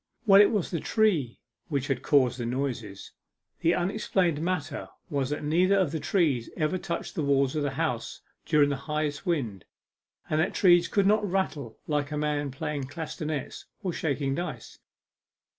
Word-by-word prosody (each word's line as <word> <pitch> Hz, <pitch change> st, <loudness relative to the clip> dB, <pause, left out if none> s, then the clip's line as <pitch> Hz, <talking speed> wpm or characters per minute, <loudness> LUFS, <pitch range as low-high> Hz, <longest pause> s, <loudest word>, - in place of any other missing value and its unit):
Well, 200 Hz, -1 st, +8 dB
it 205 Hz, -, +6 dB
was 205 Hz, -6 st, -1 dB
the 170 Hz, -, -1 dB
tree 170 Hz, -, +1 dB, 0.3 s
which 140 Hz, -5 st, -1 dB
had 135 Hz, -3 st, -1 dB
caused 130 Hz, -4 st, +3 dB
the 120 Hz, -, -2 dB
noises. 120 Hz, -6 st, -4 dB, 0.5 s
The 170 Hz, -, +3 dB
unexplained 180 Hz, -4 st, 0 dB
matter 160 Hz, -4 st, -2 dB, 0.2 s
was 140 Hz, -3 st, 0 dB
that 150 Hz, +1 st, -3 dB
neither 180 Hz, +6 st, +3 dB
of 185 Hz, -7 st, +2 dB
the 160 Hz, -, -2 dB
trees 150 Hz, -, +1 dB
ever 155 Hz, +4 st, 0 dB
touched 170 Hz, -, -4 dB
the -, -, -2 dB
walls 140 Hz, -1 st, +2 dB
of 155 Hz, -, 0 dB
the 145 Hz, -, 0 dB
house 155 Hz, -8 st, -2 dB, 0.2 s
during 145 Hz, -1 st, +3 dB
the 140 Hz, -, -1 dB
highest 150 Hz, +3 st, -2 dB
wind, 120 Hz, -, -1 dB, 0.6 s
and 155 Hz, +1 st, +1 dB
that 185 Hz, -, -1 dB
trees 175 Hz, -3 st, +5 dB
could 200 Hz, -2 st, +2 dB
not 210 Hz, 0 st, +3 dB
rattle 155 Hz, -, -2 dB
like 145 Hz, -2 st, -1 dB
a 150 Hz, -, -2 dB
man 150 Hz, -1 st, -1 dB
playing 135 Hz, +1 st, -4 dB
castanets 155 Hz, -1 st, -5 dB, 0.2 s
or 180 Hz, -3 st, -1 dB
shaking 140 Hz, -3 st, -1 dB
dice. 175 Hz, +5 st, -5 dB
150 Hz, 170 wpm, -27 LUFS, 140-175 Hz, 0.6 s, Well